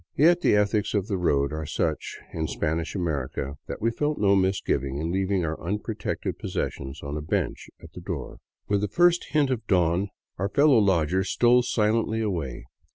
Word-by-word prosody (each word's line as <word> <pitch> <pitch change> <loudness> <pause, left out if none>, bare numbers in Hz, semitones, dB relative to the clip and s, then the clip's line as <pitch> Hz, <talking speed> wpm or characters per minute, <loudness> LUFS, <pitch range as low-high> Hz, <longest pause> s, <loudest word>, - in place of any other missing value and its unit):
Yet 170 +5 +5
the 105 - +4
ethics 105 +1 +1
of 100 -2 +1
the 100 -2 -2
road 70 -5 +1
are 80 -1 -4
such - - -2 0.2
in 80 -1 -2
Spanish 80 +4 -2
America 70 -5 -3
that - - -6
we 115 - +3
felt 150 +5 -1
no 100 -1 +4
misgiving 95 -8 0
in 80 +3 -2
leaving 95 -1 0
our 80 0 -4
unprotected 105 +4 -3
possessions 65 0 -4
on 70 +1 -4
a - - -3
bencb 75 - -2 0.2
at - - -12
the - - -9
door. - - -6 0.3
With 100 -1 +1
the 105 - 0
first 175 - +3
hint 145 -3 +3
of 120 -3 -3
dawn 90 +1 +2 0.3
our 100 +2 0
fellow 140 +2 +5
lodgers 95 -1 +2
stole 120 +1 +4
silently 110 -1 +1
away. 85 - -3
95 Hz, 180 wpm, -26 LUFS, 80-110 Hz, 0.3 s, Yet